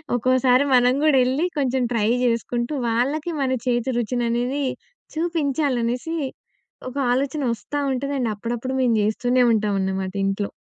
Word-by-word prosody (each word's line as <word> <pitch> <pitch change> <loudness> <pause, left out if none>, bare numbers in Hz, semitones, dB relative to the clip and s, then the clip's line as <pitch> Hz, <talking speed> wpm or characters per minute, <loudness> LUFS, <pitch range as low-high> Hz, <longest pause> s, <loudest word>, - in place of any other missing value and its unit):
ఒక్కోసారి 255 +2 +3
మనం 250 0 +5
కూడెళ్లి, 270 +1 +3
కొంచెం 260 -2 +1
ట్రై 215 -1 +1 0.2
చేసుకుంటూ, 240 +2 -1 0.2
వాళ్ళకి 280 +9 0
మన 265 -1 0 0.2
చేతి 240 +1 +1
రుచిననేది 245 +3 -1 0.5
చూపించాలి 305 -5 0
అనేసి, 250 +8 -2 0.7
ఒక 255 - -13 0.2
ఆలోచన 280 +3 -1
వస్తా 290 +6 -5
ఉంటది 275 +2 -2
అండ్ 230 -3 0
అప్పుడప్పుడు 240 +4 -4
మేము 240 -3 +3
జేస్తూనే 245 +4 +2
ఉంటాం 210 -2 +1
అన్నమాట 190 0 -2
ఇంట్లో. 195 +1 -2
250 Hz, 130 wpm, -22 LUFS, 235-275 Hz, 0.7 s, మనం